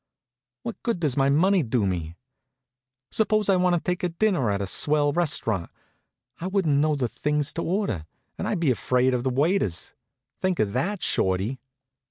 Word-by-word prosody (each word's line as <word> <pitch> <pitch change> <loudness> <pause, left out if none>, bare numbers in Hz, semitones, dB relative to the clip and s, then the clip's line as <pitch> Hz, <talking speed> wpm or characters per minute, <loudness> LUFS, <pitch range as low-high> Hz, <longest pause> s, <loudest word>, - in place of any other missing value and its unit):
What 230 -4 -6
good 230 -7 -1
does 150 -6 0
my 135 -1 +3
money 185 +6 +4
do 120 -5 0
me? 85 -3 -3 1.0
Suppose 215 -2 +1
I 195 - +5
want 180 -1 +3
to - - +1 0.2
take 175 -2 -4
dinner 185 - +2
at 100 -1 0
a 100 - -2
swell 145 +9 +2
restaurant 115 - +1 0.7
I 175 - -3
wouldn't 185 -7 +1
know 155 0 +2
the 130 -4 0
things 150 +4 -1
to 170 - -3
order, 170 - -2 0.3
and - - -4
I'd - - -1
be 160 -6 +2
afraid 125 +1 +1
of 125 - 0
the 130 - 0
waiters. 140 - 0 0.5
Think 185 -2 0
of 100 -2 0
that, 180 - -1
Shorty." 95 +7 0
150 Hz, 175 wpm, -25 LUFS, 120-180 Hz, 1.0 s, I